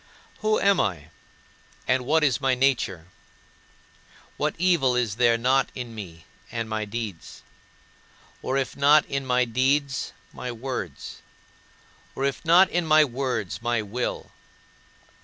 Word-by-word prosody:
Who 215 0 +1
am 200 -1 +3
I, 80 -7 -2 0.8
and 125 -1 +1
what 160 +2 +3
is 135 -6 +2
my 135 -1 +2
nature? 125 -10 0 1.3
What - - -1
evil 165 -8 +2
is 115 -4 -1
there 120 -1 +4
not 130 +3 +2
in 125 -3 -6
me 85 -7 -9 0.3
and 115 -1 -3
my 110 -1 -3
deeds; 105 -5 -7 1.0
or 130 - -1
if 135 -2 -2
not 145 +2 +5
in 135 -1 -4
my 125 0 +2
deeds, 135 +3 0 0.2
my 125 - -5
words; 120 - -6 0.9
or 135 - -1
if 140 - -2
not 175 +4 +6
in 175 0 +1
my 155 0 +6
words, 120 - -3
my 120 -2 0
will? 120 +5 -4
125 Hz, 135 wpm, -25 LUFS, 115-140 Hz, 1.3 s, not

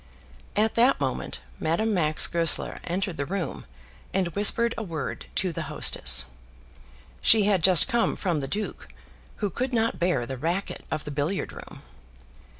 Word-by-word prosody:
At 215 +1 +2
that 245 - +4
moment 130 - -3 0.2
Madame 215 +8 0
Max 155 -5 +3
Goesler 170 -2 +2
entered 185 0 -2
the 140 - -2
room 180 - -4 0.5
and 190 -2 +1
whispered 220 +5 +3
a - - -4
word 165 -7 -5
to 185 -2 +1
the - - -4
hostess. - - +2 1.0
She 220 -2 +6
had 200 -3 +2
just 185 -4 +5
come 235 -3 +1
from 175 -6 -1
the 135 - -4
duke, 210 +7 -4 0.6
who 200 - -2
could 255 +7 -3
not 225 0 +1
bear 170 -9 +1
the 130 +1 -5
racket 170 +8 -3
of 155 - -3
the 150 - -5
billiard 145 +7 -2
room. - - -11
185 Hz, 155 wpm, -26 LUFS, 155-210 Hz, 1.0 s, She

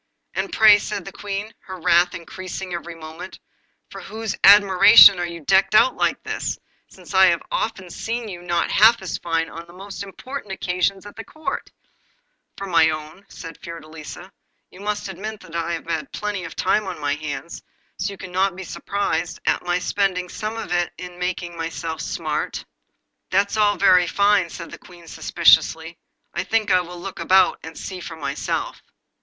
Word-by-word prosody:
'And - - -3
pray,' 215 -1 +7
said 200 -2 -5
the 195 - -7
Queen, 205 +3 -5
her 185 -1 -8
wrath 175 +1 +3
increasing 185 +1 -7
every 170 0 -6
moment, 165 +3 -9 0.5
'for - - -8
whose 220 -1 -5
admiration 200 0 +8
are 175 - -1
you 170 -1 -8
decked 195 +5 +3
out 255 +4 +5
like - - 0
this, - - -3 0.3
since - - -13
I 190 0 +7
have 170 -2 +1
often 190 -5 -3
seen 230 +4 -4
you 175 -4 -7
not 175 -1 -1
half 225 0 +5
as 185 - -4
fine 165 -1 -1
on 165 +1 -10
the 170 - -15
most 195 +2 -9
important 205 +3 -7
occasions 190 +1 -1
at 210 +2 -9
Court?' 310 0 -5 0.9
'For 195 - -5
my 165 -4 +4
own,' 155 +2 -6
answered 165 -5 -11
Fiordelisa. 160 +2 -9 0.4
'You 185 - -14
must 210 0 -3
admit 205 +3 -6
that 170 -2 -12
I 170 0 -1
have 165 - -5
had 165 -2 -3
plenty 205 -4 -4
of 165 - -9
time 210 -2 +1
on 185 - -5
my 145 -1 0
hands, 150 +1 -6 0.4
so 200 - -2
you - - -12
cannot 185 +1 -1
be 190 - -7
surprised 200 -1 -3
at - - +1
my 175 0 0
spending 180 -1 -1
some 215 +4 -5
of 205 - -6
it 175 -1 0
in 180 -1 -9
making 180 -1 -3
myself 165 -1 -4
smart.' - - -3 0.6
'That's 200 +2 +1
all 210 -1 +3
very 180 -2 +5
fine,' 200 -2 +3
said 170 0 -9
the - - -10
Queen 175 -2 -16
suspiciously. 165 0 +2 0.3
'I 175 - -2
think 220 0 0
I 180 - +5
will 175 0 -9
look 190 +2 -7
about, 190 0 +4
and 160 0 -10
see 185 -2 -6
for 170 -2 -8
myself. 140 -3 -3
180 Hz, 180 wpm, -22 LUFS, 170-200 Hz, 0.9 s, admiration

